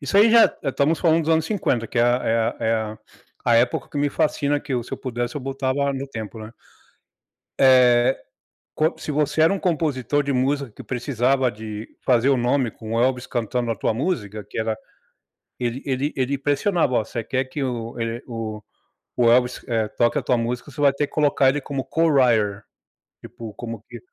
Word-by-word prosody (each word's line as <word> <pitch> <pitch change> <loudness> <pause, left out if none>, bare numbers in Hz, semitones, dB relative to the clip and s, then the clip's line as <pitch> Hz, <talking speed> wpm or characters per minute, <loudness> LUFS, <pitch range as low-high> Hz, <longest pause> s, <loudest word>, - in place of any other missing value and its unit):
isso 145 +7 -1
aí 215 +2 +7
já, 230 0 +8 0.2
eh, - - -1
estamos 150 +4 +1
falando 165 -1 +3
dos 160 - -1
anos 160 0 +2
50, 125 - 0
que 120 - -3
é - - +5
a 120 +1 +2
é 115 +1 +2
a 110 0 -1
é 115 - +2
a 110 -1 -3 0.5
a 120 - +4
época 120 - +1
que - - -7
me 145 0 +1
fascina, 145 -1 0
que 135 - -4
eu, 120 - -1
se - - -13
eu - - -3
pudesse, 120 -1 -3
eu 145 - -3
voltava 135 +1 -1
no 135 +1 -4
tempo, 110 -2 -7
né? 110 +1 -9 1.1
Eh, 125 -1 +5 0.6
co 155 +2 +2
se 150 - -5
você 150 +1 +1
era 165 +5 +5
um 195 - -2
compositor 145 - 0
de 140 -1 -1
música 135 +1 0
que - - -11
precisava 130 0 0
de 110 0 -7 0.2
fazer 125 +1 +3
o 135 - +4
nome 125 0 +1
com 110 0 -8
o 115 - +2
Elvis 125 -1 +1
cantando 120 0 -2
a - - -2
tua 110 - 0
música, 110 - -3
que - - -8
era 110 -1 -1 0.8
ele 120 +1 -3
ele 135 +2 -1
ele 135 +2 0
pressionava: 145 +1 +1
“Ó, 110 - +2
você 115 +1 -5
quer 130 0 -1
que 140 +2 -5
o 120 -2 -4
ele, 115 +1 -3
o 110 -3 -5 0.5
o 120 -1 +4
Elvis, 125 +1 +2
eh, 110 -2 0
toque 120 +5 +2
a - - -2
tua 125 0 +2
música, 120 +4 -3
você 145 +2 -9
vai 140 -1 +5
ter 145 +1 -1
que - - -24
colocar 145 -3 +3
ele 145 +2 +1
como 135 -1 -4
co-writer, 125 -11 +2 0.6
tipo, 115 -2 -9
como 115 -2 -7
que 120 -1 -9
130 Hz, 210 wpm, -23 LUFS, 115-140 Hz, 1.1 s, já